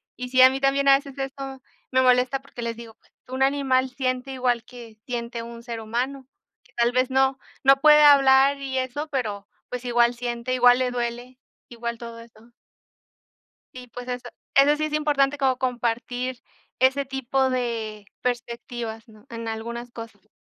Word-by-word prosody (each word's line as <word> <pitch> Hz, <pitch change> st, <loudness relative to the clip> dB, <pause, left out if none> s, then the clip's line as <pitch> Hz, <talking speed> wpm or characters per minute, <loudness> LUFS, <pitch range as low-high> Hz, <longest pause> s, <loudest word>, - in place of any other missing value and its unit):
y 250 Hz, 0 st, -6 dB
sí, 255 Hz, 0 st, +4 dB
a 260 Hz, -, +10 dB
mí 265 Hz, +1 st, -3 dB
también 275 Hz, 0 st, +2 dB
a 275 Hz, -, +8 dB
veces 275 Hz, -1 st, -11 dB
eso 270 Hz, 0 st, -6 dB, 0.3 s
me 260 Hz, -, +3 dB
molesta 255 Hz, +1 st, +3 dB
porque 270 Hz, -3 st, -10 dB
les 230 Hz, 0 st, -3 dB
digo: 230 Hz, -2 st, -11 dB
"Pues -, -, -32 dB, 0.2 s
un 260 Hz, +1 st, -1 dB
animal 270 Hz, -2 st, +2 dB
siente 255 Hz, 0 st, -2 dB
igual 250 Hz, -3 st, 0 dB
que 235 Hz, -3 st, -12 dB
siente 235 Hz, -1 st, -4 dB
un 235 Hz, 0 st, -9 dB
ser 235 Hz, -2 st, -6 dB
humano". 255 Hz, +4 st, -3 dB, 0.5 s
Tal 235 Hz, 0 st, +3 dB
vez 255 Hz, +1 st, +2 dB
no, 265 Hz, 0 st, +2 dB, 0.3 s
no 270 Hz, 0 st, +5 dB
puede 300 Hz, 0 st, +7 dB
hablar 275 Hz, -1 st, +6 dB
y 265 Hz, -1 st, -3 dB
eso, 260 Hz, +4 st, -3 dB
pero 210 Hz, -8 st, -3 dB, 0.2 s
pues 250 Hz, 0 st, -5 dB
igual 240 Hz, 0 st, +3 dB
siente, 240 Hz, +1 st, -4 dB
igual 245 Hz, 0 st, +5 dB
le 250 Hz, -1 st, 0 dB
duele, 245 Hz, +1 st, -4 dB, 0.3 s
igual 235 Hz, -1 st, -5 dB
todo 230 Hz, 0 st, -9 dB
eso. 230 Hz, 0 st, -17 dB, 1.2 s
SÍ, 250 Hz, -1 st, -10 dB
pues 245 Hz, 0 st, -8 dB
eso, 245 Hz, 0 st, -5 dB, 0.3 s
eso 285 Hz, +2 st, +5 dB
sí 310 Hz, -, -1 dB
es 305 Hz, -, -7 dB
importante 290 Hz, -2 st, +1 dB
como 265 Hz, -2 st, +2 dB
compartir 245 Hz, 0 st, -2 dB, 0.4 s
ese 265 Hz, +2 st, +3 dB
tipo 265 Hz, 0 st, -1 dB
de 225 Hz, -4 st, -3 dB, 0.2 s
perspectivas, 235 Hz, -1 st, -4 dB
¿no? 215 Hz, +1 st, -18 dB
En 230 Hz, -1 st, -6 dB
algunas 235 Hz, +2 st, -5 dB
cosas. 225 Hz, -3 st, -11 dB
250 Hz, 170 wpm, -24 LUFS, 235-270 Hz, 1.2 s, a